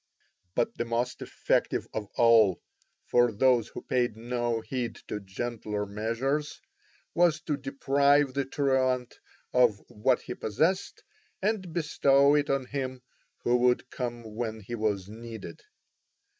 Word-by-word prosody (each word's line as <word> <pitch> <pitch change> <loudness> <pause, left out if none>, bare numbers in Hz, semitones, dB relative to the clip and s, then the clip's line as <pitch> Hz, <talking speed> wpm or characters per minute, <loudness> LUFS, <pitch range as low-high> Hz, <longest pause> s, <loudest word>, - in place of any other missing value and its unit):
But 120 - 0
the 120 - 0
most 120 +2 -2
effective - - 0
of 105 -2 -3
all, 115 -6 +5 0.5
for 120 -1 +3
those 120 +1 +3
who - - -9
paid 120 -3 0
no 120 0 -1
heed 120 -1 -3
to 105 - -3
gentler 105 +1 -4
measures, 120 +9 -2 0.5
was 170 -2 +3
to 150 - -1
deprive 140 0 +2
the 140 0 -1
truant 130 -2 0 0.3
of 125 -5 +4
what 125 +4 +1
he - - -5
possessed 160 - -1 0.4
and 195 -3 -1
bestow 140 -3 +3
it 145 -1 +2
on 135 -1 +1
him 130 -1 -4 0.4
who 120 - +3
would 125 0 +2
come 120 -3 -5
when 110 -1 -3
he 105 +4 -8
was 105 -4 -1
needed. 115 - -9
125 Hz, 130 wpm, -28 LUFS, 115-140 Hz, 0.5 s, all